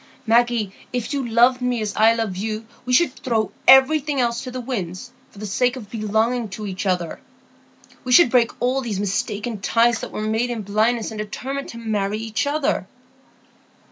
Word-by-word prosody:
Maggie, 230 -3 +2 0.2
if 250 +2 -3
you 270 -4 -2
loved 245 +3 +4
me 250 -1 0
as 210 -2 -3
I 220 +1 +5
love 225 -5 -2
you, 215 +3 -4 0.2
we - - -1
should 295 0 +4
throw 225 -4 -1 0.2
everything 275 +2 +5
else 235 -1 0
to 255 - -6
the 255 0 -5
winds 235 -3 -5 0.2
for - - -20
the 215 - -6
sake 245 +5 +1
of 215 -6 -10
belonging 220 +1 0
to 210 +2 -7
each 190 0 -4
other. 180 -3 -2 0.8
We 255 - -4
should 250 -1 +7
break 240 -2 +4
all 255 +2 +1
these 220 -6 -3
mistaken 205 +2 -2
ties 230 +2 +2
that - - -7
were - - -5
made 220 +3 0
in 230 -3 -4
blindness, 220 +4 0
and 215 - -7
determine 265 +6 -5
to 235 - -9
marry 210 -3 -2
each 225 +5 -2
other." 290 0 0
230 Hz, 185 wpm, -22 LUFS, 215-250 Hz, 0.8 s, should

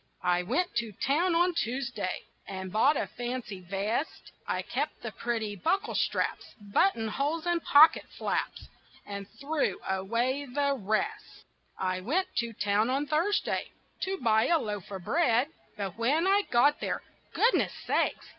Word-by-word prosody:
I 180 0 +2
went 280 - -1
to 230 -3 -1
town 330 - +1
on 350 +1 +3
Tuesday 240 - -2 0.2
And 190 -1 -6
bought 270 +8 +4
a - - 0
fancy 240 -5 -5
vest. 200 - -3 0.2
I - - -1
kept - - -3
the - - -4
pretty 225 -3 -2
bucklestraps, 375 - -1 0.2
Buttonholes 290 - +1
and 345 -1 +1
pocketflaps, 305 +3 +3 0.4
And 200 -1 -6
threw 280 - 0
away 230 +9 0
the 280 +2 0
rest. 215 -2 -3 0.3
I 185 -1 -1
went 355 - 0
to 235 -1 0
town 210 +1 +1
on 275 +3 +1
Thursday 330 +8 0 0.3
To 385 0 -2
buy 220 -5 +3
a 340 - +4
loaf 210 - -4
of 190 -3 -6
bread, 280 - +2 0.3
But 200 0 -4
when 290 +9 +2
I 400 +1 +3
got 285 +5 +4
there, - - -2 0.3
goodness 475 +2 +3
sakes! - - 0
240 Hz, 140 wpm, -29 LUFS, 205-305 Hz, 0.4 s, bought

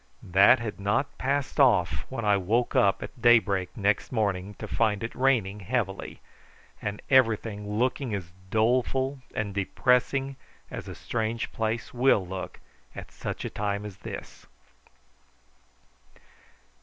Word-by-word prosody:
This 100 +7 +6
had 110 -3 -5
not 105 +8 0
passed 140 +1 -1
off 105 -11 +3
when 115 -4 -4
I 105 -1 +4
woke 110 +6 0
up 100 -1 +3
at 120 - -10
daybreak 110 -6 +3
next 100 -1 +1
morning, 100 -4 -1
to - - -7
find 110 -2 0
it 115 - -4
raining 115 -7 +1
heavily, 100 -1 -3 0.6
and 105 0 -4
everything 110 -5 +2
looking 130 +1 0
as 90 -4 -6 0.2
doleful 130 +5 +1 0.2
and 100 -2 -2
depressing 125 +6 +1 0.3
as - - -6
a - - -7
strange 115 0 -3
place 110 +1 -2
will 120 -6 +3
look 95 +1 -6 0.4
at - - -9
such - - -5
a - - -2
time 100 0 -2
as 100 -2 -8
this. - - -9
110 Hz, 130 wpm, -27 LUFS, 100-125 Hz, 0.6 s, This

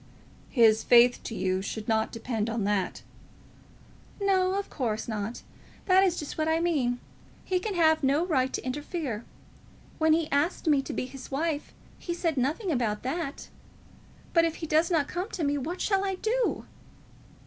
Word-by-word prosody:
"His 225 -3 +4
faith 245 0 +6
to 225 - -4
you 185 -1 0
should 215 +2 -5
not 220 -1 +1
depend 230 -1 -3
on 225 -2 -1
that." 200 -2 -1 1.2
"No, 380 -2 +2
of 400 0 -2
course 220 -5 -3
not; 215 +1 -4 0.4
that 380 0 +5
is 360 -2 +2
just 300 +1 -6
what 310 - +1
I 320 +1 +2
mean. 275 -8 +1 0.5
He 370 -1 +1
can 405 +1 -3
have 315 -2 +4
no 280 +5 +3
right 265 -7 +1
to - - -3
interfere. 270 -3 -4 0.7
When 315 0 +4
he 320 -1 +1
asked 290 +8 +1
me 295 -4 +4
to - - -6
be - - -2
his 260 0 -10
wife, 300 +2 -2 0.3
he 345 - -4
said 335 -3 0
nothing 300 - 0
about 230 -7 -1
that. 280 +2 -4 0.8
But 335 - +5
if 330 -1 0
he 325 - -5
does 315 +2 +2
not 315 -5 +2
come 360 +4 -4
to 350 - -4
me, 285 0 +1
what 335 +7 -4
shall 390 -2 +1
I 385 -1 -1
do?" 465 +5 -1
295 Hz, 175 wpm, -28 LUFS, 245-345 Hz, 1.2 s, faith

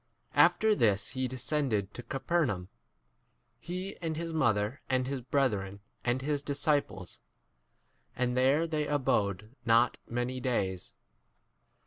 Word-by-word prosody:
After 220 0 +5
this 105 - +2
he 130 0 -2
descended 125 -5 -1
to - - -6
Capernaum, 135 - -1 0.9
he 185 +4 -5
and 160 -3 -3
his 165 0 -3
mother 110 -4 +1
and 130 -1 +1
his 135 0 -3
brethren 105 -7 0 0.2
and 125 +2 0
his 145 0 0
disciples; 145 - 0 1.0
and 125 0 0
there 135 +5 +3
they 155 -2 -1
abode 110 -6 0
not 115 0 +3
many 120 +2 -2
days. 100 -8 -2
130 Hz, 115 wpm, -30 LUFS, 110-150 Hz, 1.0 s, After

